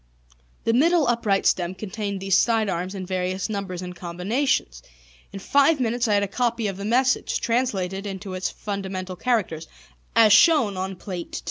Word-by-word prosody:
The 230 - +1
middle 320 +5 +4
upright 220 -5 +1
stem 180 0 +1
contained 200 0 -4
these 195 -1 +2
side 225 -3 +2
arms 180 +3 -3
in 190 -1 -5
various 185 +1 -2
numbers 195 -4 -4
and 180 0 -7
combinations. 180 - -1 0.5
In - - -7
five 280 +8 +3
minutes 240 0 0
I 210 - +3
had 200 - +2
a - - -1
copy 235 +2 -1
of 195 -2 -2
the 200 - -6
message, 250 +4 +1
translated 205 -5 -1
into 195 0 -6
its 185 0 -2
fundamental 190 -2 -5
characters, 180 -7 -1 0.5
as 220 -2 +6
shown 265 - +5
on 190 +1 -4
Plate 180 -2 -7
II. - - -2
200 Hz, 170 wpm, -24 LUFS, 185-235 Hz, 0.5 s, as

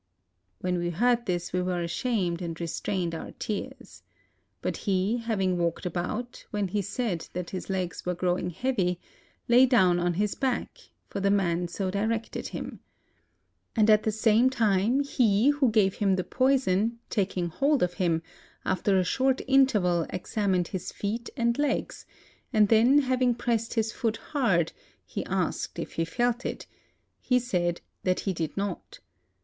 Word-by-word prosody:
When 180 -1 0
we 175 0 -1
heard 235 +7 +1
this, 175 -1 -2
we 180 - +1
were 180 -1 -1
ashamed, 180 -2 -1
and 165 -2 -5
restrained 170 +1 -2
our 165 - -6
tears. 210 -2 -6 0.6
But - - -2
he, 195 +3 0
having 195 -6 0
walked 170 0 -1
about, 180 +8 -3
when 205 -3 -1
he 205 +2 0
said 200 -3 -3
that 180 -1 -4
his 185 - -5
legs 185 -2 -2
were 180 0 -1
growing 180 0 0
heavy, 180 -3 -1 0.5
lay 250 +2 +6
down 185 -8 +4
on 175 0 0
his 205 +2 0
back; 260 -2 -2 0.3
for - - -5
the 200 0 +2
man 180 -3 +1
so 185 +2 -3
directed 220 +3 -2
him. - - -6 1.0
And 220 -1 +5
at 215 0 +6
the 220 - 0
same 220 +3 +4
time 225 +1 +2
he 240 -3 +3
who 285 -3 +3
gave 210 -4 +3
him 195 -2 +1
the 185 - -1
poison, 235 -4 +1
taking 185 -3 0
hold 275 - +2
of 175 0 0
him, 170 -4 0 0.4
after 195 +1 +2
a 185 - +3
short 260 +7 +1
interval 210 -11 +3
examined 185 -1 -1
his 185 - -4
feet 225 +4 -3
and 235 +1 +1
legs; 290 -2 -1 0.4
and 215 -4 +4
then 240 +6 +6
hav 255 -1 0
ing 245 -2 +3
pressed 230 -1 -1
his 225 -1 +1
foot 225 -1 -1 0.2
hard, 215 - +2 0.3
he - - -4
asked - - -2
if - - -5
he 165 - 0
felt 240 +7 0
it: - - -4 0.5
he 250 - +2
said 180 -8 -1 0.2
that 185 -1 0
he 195 - -1
did 165 0 -4
not. 200 -2 -4
200 Hz, 165 wpm, -27 LUFS, 180-235 Hz, 1.0 s, lay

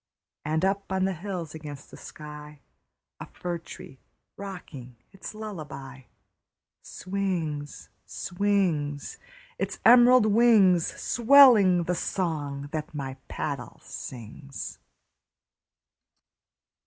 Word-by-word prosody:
And 160 +4 0
up 195 0 -1
on 190 0 +1
the 190 - 0
hills 175 -3 -6
against 150 -3 -9
the - - -10
sky, 150 -1 -11 0.6
A - - -8
fir 175 -1 -5
tree 135 -4 -12 0.4
rocking 165 -11 -9 0.2
its 195 +2 -9
lullaby, 140 - -8 0.8
Swings, 175 -7 -4 0.2
swings, 175 -7 -1 0.4
Its - - -3
emerald 245 0 +7
wings, 210 -6 +5
Swelling 235 -8 +6
the 180 - -1
song 145 -6 -3
that 155 -1 -5
my 135 -2 -5
paddle 140 -5 -5
sings. 130 +3 -8
170 Hz, 90 wpm, -27 LUFS, 145-195 Hz, 0.8 s, emerald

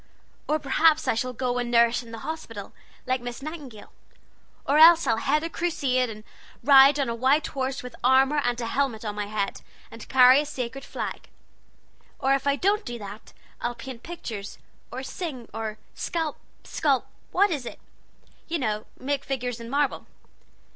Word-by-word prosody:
Or 305 - +2
perhaps 310 +2 +3
I - - +3
shall 255 +3 -2
go 250 0 -2
and 245 -1 -2
nurse 235 0 +4
in 235 -2 -13
the 225 - -8
hospital, 230 -11 -6 0.3
like 255 -1 0
Miss 245 +2 -7
Nightingale. 285 -9 -8 0.7
Or 290 +2 +3
else 335 0 +8
I'll 225 -4 +2
head 295 +6 +1
a 330 - -2
crusade 265 -8 0
and 215 -1 -9 0.4
ride 275 +1 +7
on 275 - +1
a 235 - -1
white 265 +6 +2
horse, 265 0 -3
with 250 - -8
armor 265 +3 +4
and 245 0 0
a 235 - -2
helmet 235 -3 -1
on 210 - -2
my 205 0 -4
head, 205 -1 -3 0.3
and 230 - -11
carry 255 +1 +7
a - - -5
sacred 270 -1 -5
flag. - - -6 0.9
Or 270 +1 +2
if 275 +1 0
I 280 - +3
don't 405 +7 +1
do 240 -1 -5
that, 205 0 -10 0.3
I'll 240 0 -2
paint 235 0 -9
pictures, 230 -12 -7 0.3
or 255 +2 -5
sing, 265 -5 -6
or 220 -1 -4 0.2
scalp 325 -3 -3 0.2
sculp, 280 -5 0 0.3
what 400 +2 +3
is 275 -7 -3
it? - - -8 0.7
you 335 - -1
know 215 -6 -2
make 280 +1 -2
figures 250 -3 -3
in 230 0 -8
marble. 285 +1 0
260 Hz, 175 wpm, -26 LUFS, 235-290 Hz, 0.9 s, else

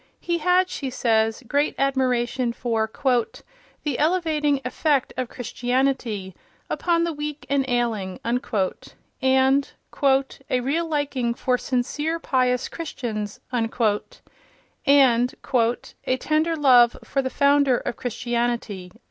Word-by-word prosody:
He 345 -1 -1
had, 360 +3 +3
she 275 -7 -4
says, 225 -1 +1
great 285 +4 +1
admiration 255 -2 0
for 225 -2 -1 0.9
"the 290 -5 -2
elevating 305 -3 +1
effect 275 +1 0
of 255 -1 -3
Christianity... 245 -5 -1 0.4
upon 340 -1 +1
the 335 -1 -1
weak 295 0 -5
and 280 -1 +3
ailing," 225 -6 -1 1.0
and 265 +1 +3 0.8
"a 250 - +2
real 300 +7 -1
liking 280 -6 -1
for 250 +1 +1
sincere, 295 +6 -1
pious 255 -5 +1
Christians," 225 -10 -5
and 225 -2 0 1.7
"a 245 +1 -1
tender 310 +4 +1
love 250 -5 +5
for 275 - -1
the 260 - -2
Founder 280 -2 +3
of - - -4
Christianity." 235 -6 -2
260 Hz, 105 wpm, -23 LUFS, 240-295 Hz, 1.7 s, love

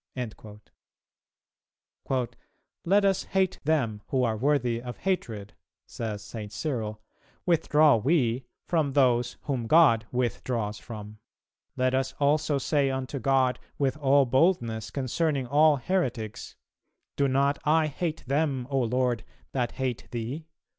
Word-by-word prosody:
"[269:5] 115 +2 -8 0.5
"Let 200 +3 +4
us 195 -2 +2
hate 190 -1 0
them 125 -9 0
who 130 -2 +1
are 115 -2 +1
worthy 125 -1 +1
of 125 0 -7
hatred," 115 - -3 0.3
says 105 -3 -5
St. 105 0 -7
Cyril, 110 -6 -3 0.5
"withdraw 155 -5 +4
we 125 -1 +1 0.2
from 155 -5 0
those 125 -3 +2
whom 130 -6 -2
God 115 -8 +5
withdraws 115 -2 -2
from; 105 -2 -9 0.6
let 130 0 +2
us 130 0 0
also 145 0 +2
say 140 0 +1
unto 135 +1 -3
God 130 0 +2 0.2
with 135 -1 +1
all 140 -1 +4
boldness 120 - +1
concerning 140 +1 -1
all 150 +4 +5
heretics, 125 - -2 0.6
'Do 140 - +2
not 140 +2 +2
I 155 +1 +3
hate 155 +2 -3
them, 140 -1 0
O 135 - +2
Lord, 125 -1 0 0.3
that 125 -3 -1
hate 130 -3 -3
thee?'" 125 +7 -5
130 Hz, 125 wpm, -27 LUFS, 115-150 Hz, 0.6 s, God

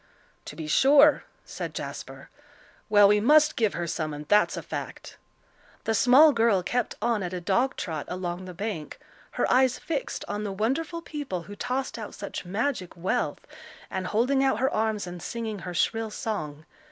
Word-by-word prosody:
"To - - -8
be 160 - -6
sure," 280 - +5 0.2
said - - -6
Jasper. - - -7 0.6
"Well, 205 -1 +7
we 210 +1 +4
must 300 +7 +5
give 220 -3 +1
her 175 - -2
some, 155 -2 -3
and 150 0 -9
that's 210 +3 +3
a - - -5
fact." - - -7 0.7
The 225 - 0
small 260 +8 +7
girl 225 -6 +3
kept 245 +6 -1
on 230 -3 +1
at 180 -1 -4
a - - -3
dog 235 +9 +1
trot 160 -5 -4
along 180 0 -4
the 180 -1 -9
bank, 195 -5 -5 0.4
her - - +1
eyes 255 0 +3
fixed 295 -5 -4
on 205 +1 -3
the 205 - -3
wonderful 280 - -2
people 285 - -5
who 205 +4 -10
tossed 255 +2 -3
out 215 - -7
such 200 - -6
magic 200 -1 -2
wealth, 175 +3 -2 0.5
and 190 -1 -3
holding 255 +7 +2
out 265 -5 +2
her 265 +4 0
arms 215 -2 0
and 175 -1 -8
singing 225 -3 -4
her 180 +1 -6
shrill 225 +4 0
song. 155 -9 -5
210 Hz, 175 wpm, -26 LUFS, 180-255 Hz, 0.7 s, Well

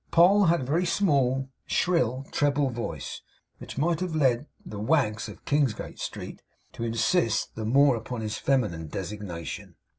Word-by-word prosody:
Poll 190 +4 +6
had 170 -2 +3
a - - -3
very 165 +7 +1
small, 135 -8 +1 0.2
shrill 135 -7 +1
treble 145 -2 +1
voice, 120 0 -5 0.4
which - - -9
might 165 +3 +1
have 180 -3 -2
led 135 -2 +2 0.2
the 105 - -7
wags 110 -3 +1
of - - -12
Kingsgate 140 -6 0
Street - - -6 0.3
to - - -5
insist 115 - +1
the 110 - -5
more 135 +3 +5
upon 115 +1 -5
his 110 0 -3
feminine 105 - 0
designation. 90 -1 -6
130 Hz, 150 wpm, -27 LUFS, 110-155 Hz, 0.4 s, Poll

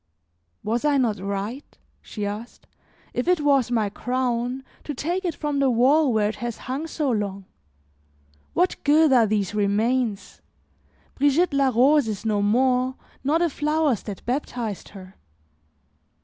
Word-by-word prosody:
"Was 230 +3 -1
I 295 -1 +3
not 225 -6 +1
right," 200 +7 -5 0.2
she 210 -2 -5
asked, 210 +4 -7 0.5
"if 245 - -2
it 360 -3 +3
was 275 -4 +3
my 225 -4 +1
crown, 250 +1 -2 0.2
to 295 - -5
take 350 +8 -2
it 345 -4 -2
from 295 -2 -2
the 275 -1 +3
wall 260 +4 +4
where 215 -2 +2
it 215 - -6
has 240 -1 -4
hung 275 +5 -3
so 300 -4 -1
long? 200 -3 -3 1.1
What 360 +1 0
good 300 0 +5
are 235 -3 +5
these 205 -2 -1
remains? 210 +2 0 0.7
Brigitte 290 +4 +2
la 275 -1 +3
Rose 260 +3 +4
is 215 0 -4
no 210 -2 +1
more, 255 +4 +2 0.3
nor 290 +4 +2
the 345 +1 +2
flowers 300 -5 0
that 200 -4 -8
baptized 240 -5 -3
her." 190 -2 -12
250 Hz, 150 wpm, -24 LUFS, 215-285 Hz, 1.1 s, good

